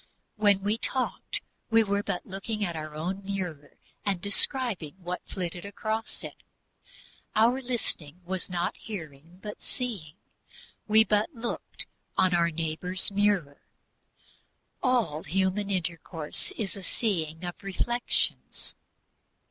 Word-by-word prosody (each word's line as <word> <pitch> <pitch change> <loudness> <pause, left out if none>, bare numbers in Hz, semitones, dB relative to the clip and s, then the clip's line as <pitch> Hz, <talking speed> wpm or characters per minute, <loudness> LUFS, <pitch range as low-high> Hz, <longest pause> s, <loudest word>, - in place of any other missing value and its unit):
When 205 -2 +4
we 210 +3 +2
talked, 260 +1 0 0.3
we 225 -1 +7
were 200 -1 +1
but 195 -3 -2
looking 205 +3 -2
at 170 -2 -2
our 155 -1 -5
own 185 +6 -2
mirror 180 -7 -4 0.3
and 195 -3 +1
describing 200 - +2
what 180 -1 -4
flitted 175 -2 -3
across 215 +3 -3
it; - - -6 1.0
our 235 +5 +5
listening 185 - -1
was 185 +1 -2
not 175 -1 0
hearing, 165 -4 -7
but 210 -1 -6
seeing 205 - -4 0.7
we 220 +1 +8
but 215 +6 +3
looked 235 0 -3 0.3
on 185 -1 +5
our 170 -1 +5
neighbor's 165 +4 0
mirror. 195 -8 +2 1.2
All 235 - +2
human 195 +3 +1
intercourse 165 -4 -2
is 205 -3 -1
a 200 - -6
seeing 170 -6 0
of 175 - -5
reflections. 240 +5 0
195 Hz, 120 wpm, -29 LUFS, 170-215 Hz, 1.2 s, we